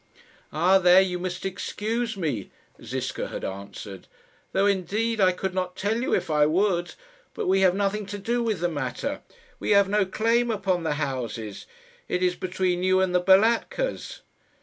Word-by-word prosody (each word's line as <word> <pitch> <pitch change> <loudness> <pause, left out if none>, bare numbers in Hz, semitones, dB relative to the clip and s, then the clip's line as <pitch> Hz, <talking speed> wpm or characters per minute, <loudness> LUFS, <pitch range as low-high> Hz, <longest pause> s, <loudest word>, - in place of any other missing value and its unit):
"Ah, 180 +5 +4
there 180 0 +7
you 185 -2 +1
must 180 0 -4
excuse 220 +4 -3
me," 145 - -3 0.3
Ziska - - -4
had - - -6
answered; 100 0 -8 0.4
"though, 195 +1 +2
indeed, 205 +3 0
I 185 -1 +5
could 185 +1 -4
not 185 -1 -2
tell 220 +4 -1
you 260 - -2
if 165 - -2
I 150 -1 +4
would. 175 +1 0 0.4
But - - -3
we 190 +1 +3
have 185 -1 +4
nothing 200 +1 -1
to 205 +1 -5
do 235 +4 -1
with 220 -7 -1
the 175 - +2
matter. 130 -7 -3 0.4
We - - -4
have 200 -1 +5
no 205 -1 +2
claim 230 +4 +1
upon 195 -5 0
the 160 -3 -1
houses. 120 -7 -4 0.4
It 180 - -1
is 180 0 +2
between 180 -1 -1
you 185 0 +3
and 190 -1 +1
the 180 - +3
Balatkas." 225 - +2
185 Hz, 170 wpm, -25 LUFS, 175-205 Hz, 0.4 s, there